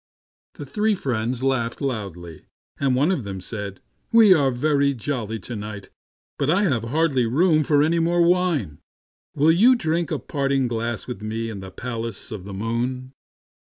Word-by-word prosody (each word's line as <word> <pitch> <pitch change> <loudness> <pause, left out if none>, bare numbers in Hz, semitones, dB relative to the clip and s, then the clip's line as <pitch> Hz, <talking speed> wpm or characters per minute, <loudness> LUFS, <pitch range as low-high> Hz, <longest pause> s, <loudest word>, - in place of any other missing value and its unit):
The 145 - -7
three 210 +8 0
friends 125 - -2
laughed 125 -3 0
loudly, 95 - -5 0.3
and 135 -2 +2
one 145 +8 +2
of 150 -10 -1
them 100 -2 -6
said, 100 0 -6
" - - -46
We 225 -4 +7
are 145 -6 +3
very 140 +2 +1
jolly 115 -3 -3
to 120 - -6
night, 105 -1 -7 0.5
but 140 - +1
I 190 +6 +3
have 130 - 0
hardly 135 -2 +1
room 155 +5 +3
for 145 0 +3
any 165 +2 +2
more 170 +1 +2
wine. 170 - +1 0.6
Will 150 +3 +4
you 230 +10 +6
drink 165 - -1
a - - -1
parting 135 -2 -1
glass 115 -1 -3
with 125 -4 -7
me 115 +1 -3
in 100 - -7
the 95 0 -8
palace 115 +3 -5
of 100 -4 -7
the 100 - -8
moon 120 +5 -3
130 Hz, 175 wpm, -23 LUFS, 115-155 Hz, 0.6 s, We